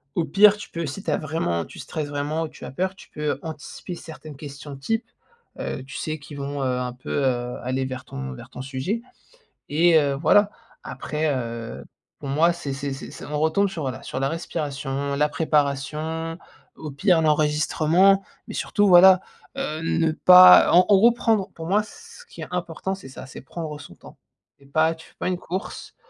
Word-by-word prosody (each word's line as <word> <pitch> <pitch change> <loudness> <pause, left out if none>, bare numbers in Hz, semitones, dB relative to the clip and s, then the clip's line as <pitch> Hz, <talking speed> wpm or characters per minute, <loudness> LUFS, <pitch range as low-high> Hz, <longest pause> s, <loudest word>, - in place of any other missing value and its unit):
au 170 - +1
pire, 200 +7 +6
tu 205 - -10
peux, 170 -1 -4
si 170 +8 -6
tu - - -1
as - - +2
vraiment 140 - -2
tu - - -14
stresses 155 -2 -4
vraiment 145 +3 -2
ou - - -3
tu - - -14
as - - -7
peur, 185 +6 -2
tu - - -16
peux 150 -1 -2
anticiper 160 +2 -7
certaines 155 -3 -11
questions 145 -1 -9
type, 225 - -2 0.5
heu, 130 - -4
tu 135 - -9
sais, 155 -1 -4
qui 145 0 -11
vont, 140 0 -4
heu, 125 -1 0
un 125 -1 -3
peu, 125 - -11 0.2
heu, 125 -1 -1
aller 130 +1 -1
vers 130 0 -6
ton 65 -1 -6
vers - - -11
ton 125 - -8
sujet 140 - -3 0.7
et 165 +2 +5
heu, 140 -1 +1
voilà. 185 +8 +4 0.3
Après 155 +1 -3
heu, 115 -2 -5 0.4
pour 140 - -6
moi, 165 +5 +3
c'est 150 -5 -5
c'est 140 0 -4
c'est 135 - -9
c'est - - -10
on 150 0 -3
retombe 160 +6 +2
sur 165 -4 -6
voilà, 130 -4 -4
sur 130 - -5
la 135 - +1
respiration, 140 -4 -3
la 150 +1 +2
préparation, 155 +2 -1 0.4
au 155 -2 -7
pire, 175 +2 +3
l'enregistrement 155 +5 +3 0.2
mais - - -7
surtout, 205 -1 +1
voilà, 185 +1 +8 0.4
heu, 155 +1 -3
ne 165 -1 +1
pas 180 +2 +8
en 180 +1 +7
en 205 - +7
gros, 235 +4 +6
prendre 220 -4 0
pour 165 - -7
moi, 205 +3 +3
ce 350 - -14
qui 470 - -12
est - - -6
important, 180 +1 -3
c'est 155 -9 -12
ça, - - -10
c'est 135 - -10
prendre 150 +2 -7
son 115 -12 -12
temps - - -15 0.4
et 140 - -20
pas 160 +4 +2
tu 160 - -15
fais - - -27
pas - - -2
une 185 -1 0
course. 185 +2 -6
155 Hz, 200 wpm, -24 LUFS, 140-175 Hz, 0.7 s, voilà